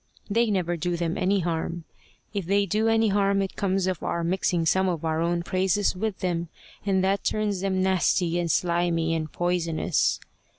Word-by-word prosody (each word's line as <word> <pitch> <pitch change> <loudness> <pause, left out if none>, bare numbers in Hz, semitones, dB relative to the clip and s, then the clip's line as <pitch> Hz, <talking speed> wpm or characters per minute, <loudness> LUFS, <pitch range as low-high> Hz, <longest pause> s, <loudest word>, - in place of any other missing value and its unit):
They 230 +2 +2
never 175 -4 0
do 175 +1 -1
them 170 -1 -1
any 195 +1 +1
harm. 170 0 -2 0.5
If 200 -5 -3
they 200 +1 +3
do 215 +4 0
any 225 -1 +3
harm, 200 0 +2
it 195 - -5
comes 190 -1 0
of 185 -3 -2
our 170 - -2
mixing 175 -1 0
some 190 +3 +2
of 165 -2 -3
our 160 0 0
own 170 0 0
praises 190 +2 +1
with 210 +1 -3
them, 170 -2 -1 0.3
and 190 -2 +1
that 195 +1 +1
turns 210 -3 -1
them 190 -1 0
nasty 180 -2 +2
and 170 -1 -1
slimy 170 0 +1
and 155 -1 -3
poisonous. 175 -2 0
180 Hz, 180 wpm, -26 LUFS, 170-195 Hz, 0.5 s, they